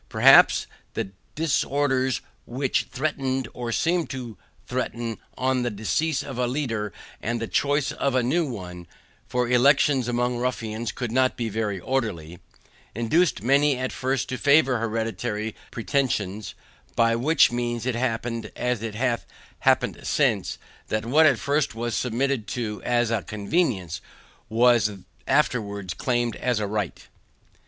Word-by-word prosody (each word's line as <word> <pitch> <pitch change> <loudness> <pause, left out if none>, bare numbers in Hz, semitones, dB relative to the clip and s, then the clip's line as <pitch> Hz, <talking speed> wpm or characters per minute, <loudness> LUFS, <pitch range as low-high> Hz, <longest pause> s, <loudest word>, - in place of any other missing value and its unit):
Perhaps - - +7 0.3
the 95 - -3 0.2
disorders 140 -4 +1 0.3
which 130 +2 -1
threatened, 135 -2 -1
or 120 -1 -4
seemed 170 +7 +1
to 125 -5 -6 0.3
threaten, 115 -1 -3 0.2
on 130 0 +1
the 120 - 0
decease 130 +8 -1
of 130 -3 -6
a 125 - +2
leader 115 -6 -2 0.3
and 120 +2 -1
the 115 - -2
choice 145 0 +1
of 140 -2 -1
a 130 - +3
new 155 +5 +1
one 90 -5 -8 0.4
(for 125 -1 0
elections 130 +1 +4
among 120 0 0
ruffians 115 -3 -2
could 120 -1 -4
not 130 +1 +2
be 115 -2 -2
very 105 -2 -2
orderly) 90 -9 -2 0.6
induced 120 - +2
many 140 +2 +3
at 130 0 -2
first 135 +1 -1
to 130 - -3
favor 140 -4 +4
hereditary 110 -1 -2 0.2
pretensions; 110 -6 -1 0.4
by 115 0 +3
which 140 +5 +4
means 120 -1 -2
it 130 - 0
happened, 115 -1 -2
as 125 -3 -1
it 110 -2 -4
hath 120 0 -1 0.3
happened - - +2
since, - - +1 0.3
that 110 0 -1
what 155 +6 +5
at 135 -5 +4
first 140 -1 0
was 120 0 -2
submitted 125 -1 0
to 105 -1 -3
as 120 -1 +1
a 115 -3 +1
convenience, 100 - -1 0.5
was 115 -2 +4 0.3
afterwards 100 - 0
claimed 120 0 0
as 125 -3 0
a 105 - -1
right. 100 -6 -3
120 Hz, 140 wpm, -25 LUFS, 110-130 Hz, 0.6 s, Perhaps